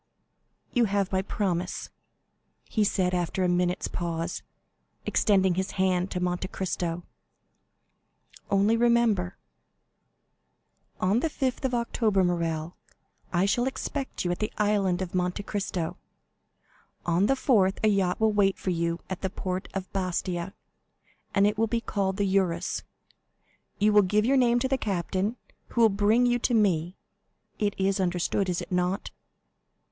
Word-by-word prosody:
"You 245 -2 +4
have 200 -2 0
my 190 -1 +1
promise," 185 -3 -2 0.7
he 215 - 0
said, 185 -3 +1
after 180 +1 0
a - - +3
minute's 180 0 +1
pause, 165 -1 -3 0.6
extending 190 -3 +3
his 190 +2 -2
hand 185 0 +1
to 180 - -3
Monte 180 +1 -1
Cristo. 175 -2 -3 1.5
"Only 200 +3 +3
remember——" 230 -6 +2 1.6
"On 195 +5 +2
the 320 - 0
5th 265 -3 -2
of 255 -2 0
October, 225 -4 +1
Morrel, 170 -2 -1 0.6
I 180 +1 +2
shall 240 +6 +1
expect 265 -3 -4
you 175 - +1
at 175 - -3
the 215 - -1
Island 200 -3 +1
of 175 - -7
Monte 180 +2 -1
Cristo. 195 -5 -3 1.1
On 175 +4 +2
the 270 - +3
4th 205 -8 +3
a - - +5
yacht 195 -4 +2
will 220 -1 +3
wait 195 -2 +3
for 185 - -2
you 170 0 -1
in 190 - -4
the 190 - -1
port 185 0 -4
of 190 -1 -5
Bastia, 185 0 -2 0.8
it 205 +1 +3
will 225 - +3
be 235 +1 0
called 195 -4 -2
the 205 - +1
Eurus. 190 -3 0 1.0
You 210 +1 +3
will 210 - +7
give 210 +3 +2
your 270 +3 +3
name 240 -2 +4
to 260 - +1
the 265 0 0
captain, 195 +2 -1 0.3
who 235 - -1
will 225 - +7
bring 210 +4 +3
you 245 0 +2
to 240 0 +1
me. 180 -5 +1 0.6
It 205 -1 0
is 195 +1 +1
understood—is 180 0 0
it - - -12
not?" 180 +2 -1
195 Hz, 145 wpm, -27 LUFS, 180-215 Hz, 1.6 s, will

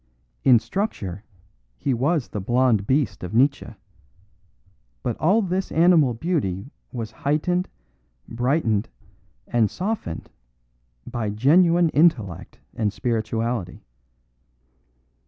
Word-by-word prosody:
In 125 -3 +7
structure 110 - -3 0.5
he 135 - -1
was 140 +3 0
the 105 - -4
blonde 120 -1 +2
beast 130 -9 0
of 90 +4 -5
Nietzsche, 135 -2 +1 1.3
but 120 - -1
all 205 +7 +3
this 190 +1 -2
animal 160 -7 +4
beauty 130 - -2 0.2
was 115 -3 -5
heightened, 175 +6 -1 0.6
brightened 120 -3 0 0.6
and 115 -3 +1
softened 190 - -4 0.7
by 115 -4 -3
genuine 165 - +4
intellect 110 - +1 0.2
and 105 -3 -1
spirituality. 115 -3 -2
125 Hz, 95 wpm, -23 LUFS, 110-165 Hz, 1.3 s, In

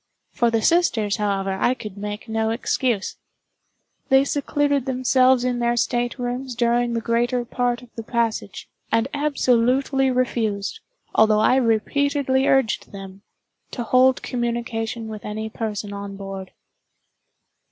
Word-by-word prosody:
For 235 - +2
the 225 -1 0
sisters, 230 - +2
however, 195 -2 -1
I 250 - +3
could 210 -6 -8
make 210 +2 -6
no 220 0 0
excuse. 230 -2 -1 0.9
They 270 0 +6
secluded 285 -1 0
themselves 255 0 +3
in 250 -1 0
their 240 0 +1
staterooms 245 +1 -2
during 240 0 +1
the 230 - -1
greater 240 +1 0
part 245 0 -1
of 240 - -17
the 230 - -6
passage, 225 -3 -2 0.2
and 225 +2 +2
absolutely 270 -1 +2
refused, 230 -5 -1 0.3
although 215 -1 +4
I 255 +4 +4
repeatedly 265 +3 +1
urged 270 -5 +1
them, 195 -1 -10 0.5
to 240 - -4
hold 255 +2 +3
communication 235 -2 -3
with 215 -1 -7
any 220 +1 -5
person 210 -2 -4
on 200 0 -6
board. 195 -1 -7
235 Hz, 130 wpm, -22 LUFS, 220-255 Hz, 0.9 s, They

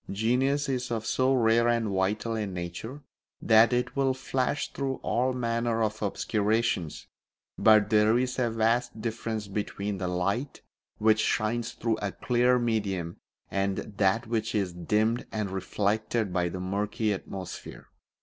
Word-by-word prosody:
Genius 130 +7 +1
is 125 -2 -2
of 115 -2 -2
so 130 +3 +2
rare 115 -2 +3
and 115 -2 +1
vital 100 +4 0
a 110 -2 -2
nature 95 +10 -6 0.4
that 110 +1 +5
it 125 +1 0
will 135 -2 +2
flash 130 +2 -2
through 135 -1 -2
all 125 +2 +1
manner 115 -2 0
of 110 0 -2
obscurations, 105 -4 0 0.5
but 110 -1 +5
there 110 +2 +4
is 125 +1 -1
a 120 -2 +2
vast 115 0 0
difference 110 -1 -3
between 100 0 -3
the 90 - -2
light 100 +10 -2 0.3
which 110 0 +3
shines 115 +2 0
through 115 -2 -1
a 100 -1 -1
clear 125 0 +2
medium 100 -8 -1 0.3
and 100 0 0 0.2
that 105 +4 +2
which 110 -1 -2
is 95 -4 0
dimmed 105 +7 0
and 105 -3 -2
reflected 105 +2 -1
by 90 -1 +1
a 85 +2 -4
murky 105 +3 -1
atmosphere. 95 -1 -8
110 Hz, 145 wpm, -28 LUFS, 100-120 Hz, 0.5 s, that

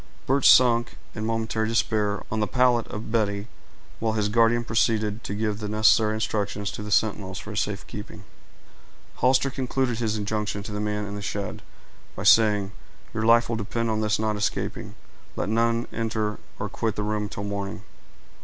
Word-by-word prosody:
Birch 135 +1 +4
sank, 120 -2 +5 0.2
in 110 0 -4
momentary 110 -1 -1
despair, 105 -3 0
on 110 - -1
the 105 - +1
pallet 125 -2 +2
of 110 +1 -7
Betty, 100 -3 0 0.5
while 110 -1 0
his 105 -2 0
guardian 115 +2 +3
proceeded 110 -1 0
to 100 - -4
give 105 -1 -1
the 105 - -4
necessary 110 0 +4
instructions 105 -2 -2
to - - -7
the 105 - -6
sentinels 100 -3 +1
for 105 - -7
his 105 - -1
safe 105 -1 -2
keeping. 105 -1 -9 0.9
Hollister 130 +2 +3
concluded 130 -2 -1
his 110 -2 0
injunctions 105 -1 -2
to 110 - -6
the 105 - -3
man 105 0 -2
in 100 - -6
the 105 - -5
shed, 100 0 -4 0.5
by 90 - -5
saying, 105 -2 +5 0.4
"Your 110 0 -1
life 115 0 +6
will 115 - -1
depend 115 +2 -2
on 110 0 0
his 105 -1 +1
not 110 -1 -1
escaping. 105 0 -3 0.4
Let - - -2
none 115 +1 +1
enter 110 -2 -2 0.2
or - - -3
quit 110 -3 -2
the 105 - -2
room 105 0 -2
till 100 - -6
morning." 100 0 -4
110 Hz, 180 wpm, -25 LUFS, 105-115 Hz, 0.9 s, life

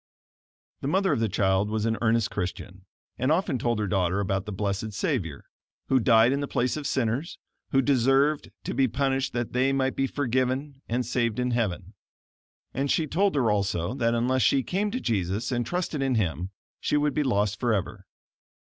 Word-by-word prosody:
The - - -3
mother 190 +2 +2
of 140 - 0
the 115 -1 +1
child 95 +1 +1
was 110 0 -1
an 115 0 +1
earnest 115 -1 +2
Christian, 95 0 -5 0.3
and 130 +4 +1
often 160 -6 +1
told 120 0 0
her 105 - -1
daughter 95 -1 +1
about 95 0 -1
the - - -4
blessed 100 +1 -2
Savior, 100 - -2 0.4
who 130 - +4
died 115 0 +5
in 140 - 0
the 140 - -2
place 125 -2 0
of 150 -2 -3
sinners, 130 +6 -1 0.3
who 135 0 +3
deserved 135 +3 +2
to - - -3
be 135 +1 +3
punished 135 +2 0
that 120 -1 -3
they 130 +2 +2
might 135 -1 0
be 135 - +1
forgiven 130 +1 -1
and 120 +2 0
saved 120 -2 0
in 125 0 0
heaven. 105 -4 -2 0.8
And 135 +2 -1
she 160 - +2
told 190 +4 +1
her 120 -6 +2
also 100 -1 0
that 115 -3 +1
unless 130 +2 +1
she 135 +1 +3
came 200 - -1
to 250 +5 -3
Jesus, 105 - -1
and 120 -1 -1
trusted 175 -5 -2
in 135 -2 +1
Him, 90 -4 -1 0.3
she 150 - +1
would 150 0 +1
be 150 - +1
lost 105 -6 0
forever. 110 -6 -1
120 Hz, 190 wpm, -26 LUFS, 105-135 Hz, 0.8 s, died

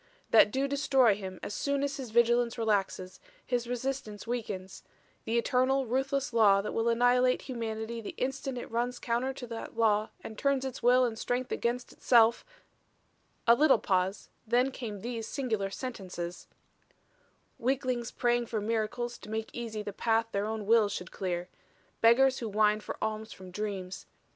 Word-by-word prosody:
That - - +7
do 270 +5 0
destroy 270 -5 +3
him 190 -2 -7
as - - -4
soon 280 +3 -1
as 285 +1 -2
his 260 -4 -6
vigilance 235 +1 +3
relaxes, 200 -4 -1 0.3
his 245 -2 -1
resistance 245 -4 -4
weakens 210 -6 -4 0.4
the 230 +1 0
eternal, 260 +3 +2
ruthless 270 +2 -1
law 205 -4 +5
that 200 - -3
will 225 +1 +1
annihilate 245 +2 +3
humanity 230 -2 -4
the 210 - -7
instant 265 0 -2
it 245 - -7
runs 240 +2 -1
counter 240 +3 -1
to 260 - -7
that 230 -1 -7
law 215 -1 +3
and 220 - -8
turns 275 -1 +1
its 265 - -5
will 250 +1 +5
and 225 -2 -3
strength 250 +1 -2
against 240 +1 -2
itself 235 -1 +4 0.5
" - - -41
A 235 - +9
little 280 +1 +5
pause; 190 -1 -1 0.2
then 250 +4 +3
came 215 -6 -6
these 230 -1 -4
singular 220 -8 -2
sentences: 185 -7 -6 1.1
"Weaklings 250 -1 -1
praying 240 -1 0
for 220 - -2
miracles 225 +3 -2
to - - -11
make 220 0 -3
easy 225 -3 -5
the 205 -1 -6
path 225 0 +1
their 200 +1 -1
own 220 -1 -3
wills 220 -1 +4
should 180 - -6
clear. 180 -2 -3 0.5
Beggars 260 +3 +5
who 230 - -4
whine 210 0 +3
for - - -7
alms 220 0 -3
from 185 -1 -12
dreams. 190 -2 -5
230 Hz, 165 wpm, -30 LUFS, 215-250 Hz, 1.1 s, A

